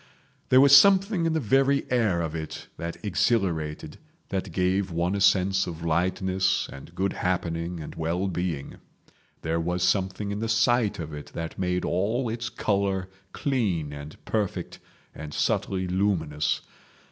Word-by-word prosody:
There 130 - +7
was 140 +1 +8
something 195 +2 +5
in 165 - 0
the 160 - +1
very 135 +3 +2
air 110 -9 +2
of 80 -2 -3
it 80 -1 -6
that 85 0 -5
exhilarated, 85 -7 0 0.3
that 95 -1 -3
gave 95 +2 +1
one 85 +2 0
a 100 - -1
sense 95 0 +3
of 85 -1 -6
lightness 95 +3 +1
and 70 - -12
good 95 +1 0
happening 85 -1 -2
and 75 - -7
well 85 +4 -1
being; 85 -6 -3 0.7
there 80 +1 0
was 90 +1 -1
something 95 +2 0
in 100 - -3
the 115 0 -2
sight 115 0 +2
of 80 -3 -6
it 75 -1 -7
that 80 +2 -5
made 90 -1 0
all 110 +8 0
its 120 +1 -3
colour 100 -2 -1 0.2
clean 95 - -1
and 75 +1 -9
perfect 105 -3 -2 0.3
and 75 -1 -8
subtly 95 -1 0
luminous. 90 -6 0
95 Hz, 150 wpm, -26 LUFS, 85-105 Hz, 0.7 s, was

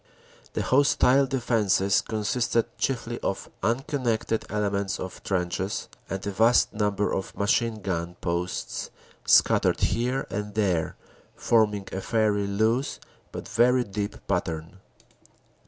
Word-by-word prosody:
The - - -1
hostile 135 0 +4
defenses 105 -7 +2
consisted 115 +2 -1
chiefly 120 -2 -2
of 95 - -3
uncon 135 +6 -1
nected 110 -1 0
elements 100 -2 -1
of 95 - -7
trenches, 95 +1 -2 0.2
and 95 0 -4
a 100 - -2
vast 115 +5 +3
number 105 -1 0
of 95 - -4
machine 110 +1 +1
gun 85 -2 -3
posts 85 +1 -3 0.4
scattered - - +4
here 125 +6 0
and 105 0 -4
there, 90 -7 0 0.4
forming 105 -4 +2
a 95 - -3
fairly 105 -3 +1
loose 110 +7 0 0.3
but - - -7
very 120 +4 +3
deep 100 -1 -5
pattern." 85 -1 -2
105 Hz, 120 wpm, -26 LUFS, 95-120 Hz, 0.4 s, hostile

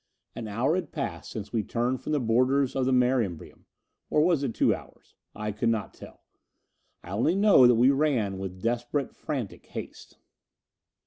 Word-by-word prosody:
An 115 -2 -5
hour 115 +9 0
had 185 +1 -2
passed 145 -4 -5
since 110 -1 -7
we 115 - +1
turned 120 +4 -2
from - - -5
the 150 - +2
borders 130 +3 +2
of 130 -1 0
the - - +2
Mare 125 0 +3
Imbrium. 90 -7 -7 0.4
Or 150 - +3
was 165 -2 +3
it 125 -5 -2
two - - +3
hours? - - -12 0.2
I 105 0 -3
could 105 +2 -1
not 110 -3 -2
tell. - - -14 0.8
I 90 - -10
only 120 - +1
know 200 -11 +6
that 120 - +5
we 125 +4 +5
ran 130 -10 0
with 95 -1 -7
desperate 120 +4 -1
frantic 135 -10 -5
haste. - - -9
125 Hz, 180 wpm, -27 LUFS, 110-140 Hz, 0.8 s, know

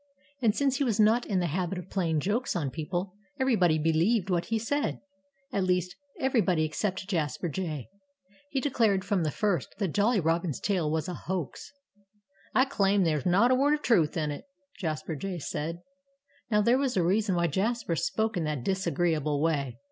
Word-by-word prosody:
And 225 -3 +3
since 275 -2 +1
he 285 - +1
was 230 -5 0
not 220 +3 +4
in 200 - 0
the 180 - +1
habit 175 +3 -2
of 180 +1 -8
playing 165 -5 0
jokes 225 - -1
on 145 -6 -1
people, 175 +5 -3 0.3
everybody 185 -12 +3
believed 170 +6 +2
what 175 -1 +1
he 225 - 0
said 285 +7 -1 0.5
at 200 - +1
least, 180 0 0 0.2
everybody 215 -11 +2
except 185 +4 -2
Jasper 170 -2 -1
Jay. 155 -5 -4 0.6
He 275 - -1
declared 225 -9 +1
from 200 -3 +1
the 155 - +1
first 200 +4 -1
that 195 -4 -1
Jolly 210 +2 +3
Robin's 165 -2 0
tale 180 -7 0
was 160 +2 -1
a 180 - -3
hoax. 175 -4 -5 0.8
"I 260 - +5
claim 200 -7 +2
that 165 - +2
there's 150 -3 -2
not 200 +8 +4
a - - +5
word 285 +3 +3
of 300 - -8
truth 170 -9 +3
in 150 -2 0
it!" 145 - -7 0.3
Jasper 160 -2 -3
Jay 185 +5 -4
said. 165 +2 -4 0.7
Now, 210 -2 +3
there 235 +5 +3
was 265 -6 0
a 180 - +3
reason 195 +2 +2
why 170 0 +2
Jasper 195 +3 0
spoke 220 +7 -1
in 175 - 0
that 150 -5 -2
disagreeable 165 -5 0
way. 145 -5 0
185 Hz, 185 wpm, -28 LUFS, 165-220 Hz, 0.8 s, I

